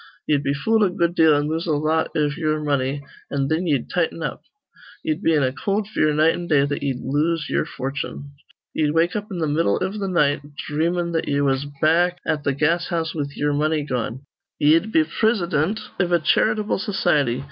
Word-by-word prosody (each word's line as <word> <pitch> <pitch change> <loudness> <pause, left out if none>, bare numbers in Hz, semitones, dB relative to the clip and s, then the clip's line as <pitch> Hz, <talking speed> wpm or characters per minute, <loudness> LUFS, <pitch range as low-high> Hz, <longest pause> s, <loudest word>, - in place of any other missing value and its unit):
Ye'd 145 -2 +2
be 140 0 -1
fooled 220 +9 +2
a 200 - +3
good 170 -1 0
deal 160 -3 +5
an' 145 +1 0
lose 160 +3 -2
a 160 - +1
lot 155 +2 0
iv 150 -1 +1
ye'er 155 -2 -1
money, 140 -1 -1 0.3
an' 140 -1 -1
thin 165 +3 0
ye'd 140 -6 0
tighten 165 -1 -1
up. - - -4 0.6
Ye'd 310 -1 -1
be 165 - +3
in 145 - +2
a 130 0 0
cold 200 +5 -1
fear 155 -8 +1
night 155 +2 +3
an' 175 - -5
day 140 -4 +3
that 145 0 -3
ye'd 135 -3 -2
lose 150 +3 0
ye'er - - +1
fortune. 140 +1 -5 0.4
Ye'd 150 0 0
wake 170 +2 +2
up 210 0 -3
in 190 - -5
th' 160 -2 -1
middle 155 +3 +1
iv 190 +1 -2
th' 200 -2 -3
night, 150 -6 +2 0.3
dhreamin' 170 +3 0
that 165 - -1
ye 140 0 +1
was 135 0 0 0.2
back 175 +3 +3
at 150 -1 -1
th' 140 -2 -1
gas 165 +4 +1
house 165 -2 -2
with 145 -2 -4
ye'er 145 0 0
money 155 +1 +1
gone. 125 -1 -4 0.3
Ye'd 165 +8 +3
be 160 - +4
prisidint 180 0 0 0.2
iv 180 -2 +1
a 175 - +5
charitable 215 +6 +1
society. 150 - +1
155 Hz, 210 wpm, -22 LUFS, 145-175 Hz, 0.6 s, deal